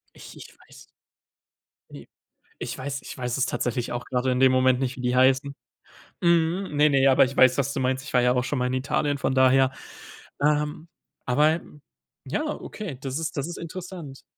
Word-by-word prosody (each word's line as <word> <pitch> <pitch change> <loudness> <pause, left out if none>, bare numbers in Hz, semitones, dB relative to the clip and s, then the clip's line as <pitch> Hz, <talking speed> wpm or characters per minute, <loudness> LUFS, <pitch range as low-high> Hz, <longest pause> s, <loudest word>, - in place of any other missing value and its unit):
Ich - - -13
ich - - -13
weiß - - -16 1.1
Ne, - - -11 0.5
ich - - -5
weiß 140 +1 -5
ich - - -10
weiß 125 0 -3
es 135 - +2
tatsächlich 120 -2 -2
auch 120 0 -4
gerade 130 0 -1
in 125 - 0
dem 130 0 +5
Moment 130 -1 +3
nicht, 130 -1 -2
wie - - -6
die 125 0 0
heißen. 130 +2 +3 0.7
Mhm, 170 0 +1
ne, 150 +1 +5
ne, 135 -1 +4
aber 135 0 +6
ich 135 +2 -5
weiß, 130 0 +5
was 140 0 0
du 140 - -3
meinst. 130 +1 -1
Ich 150 - -9
war 125 - +5
ja 125 0 +3
auch 125 0 0
schon 145 - -2
mal 125 - 0
in 125 - -2
Italien, 145 +2 -1
von 135 - -1
daher. 130 0 +4 0.7
Ähm, 150 +2 0 0.4
aber 150 +6 +3 0.6
ja, 145 - -2
okay, 205 - -6
das 135 +1 -4
ist 165 0 -4
das 140 +2 -2
ist 175 - -7
interessant. 170 -4 -8
135 Hz, 195 wpm, -25 LUFS, 130-150 Hz, 1.1 s, aber